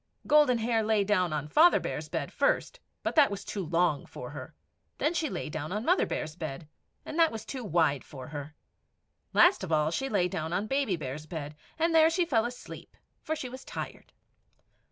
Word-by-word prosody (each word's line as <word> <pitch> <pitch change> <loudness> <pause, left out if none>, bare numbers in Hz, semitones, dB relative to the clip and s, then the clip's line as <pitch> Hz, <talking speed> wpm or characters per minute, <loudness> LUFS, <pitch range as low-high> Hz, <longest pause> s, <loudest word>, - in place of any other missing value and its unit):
Golden 295 -5 +5
Hair 225 0 +1
lay 215 -1 +2
down 185 -4 +1
on 150 -1 -2
Father 325 - +6
Bear's - - -5
bed - - -3
first, - - +1 0.2
but - - -1
that 295 -3 +6
was 200 -1 -6
too 200 - -4
long 170 -2 +1
for - - -8
her; - - -9 0.4
then 310 - +1
she 320 -3 0
lay 180 - -4
down 155 +1 -5
on 210 +4 -2
Mother 360 +2 +3
Bear's 155 - -4
bed, 155 -2 -6 0.4
and 315 - -4
that 330 -1 +5
was 220 -1 -6
too 260 -3 -6
wide 160 - +1
for 130 -1 -10
her; 145 0 -7 0.8
last 350 - +5
of 180 - -5
all 155 0 +2
she 270 +10 -2
lay 190 -6 +2
down 160 -1 -4
on 195 +4 0
Baby 270 -4 0
Bear's 150 0 -6
bed, 150 -2 -6 0.2
and 330 +1 +1
there 320 0 +6
she 345 +1 +1
fell 230 -8 +2
asleep, 245 +1 -9 0.2
for 315 -1 -2
she 265 - -5
was 260 +1 -9
tired. - - -7
205 Hz, 200 wpm, -29 LUFS, -, 0.8 s, Father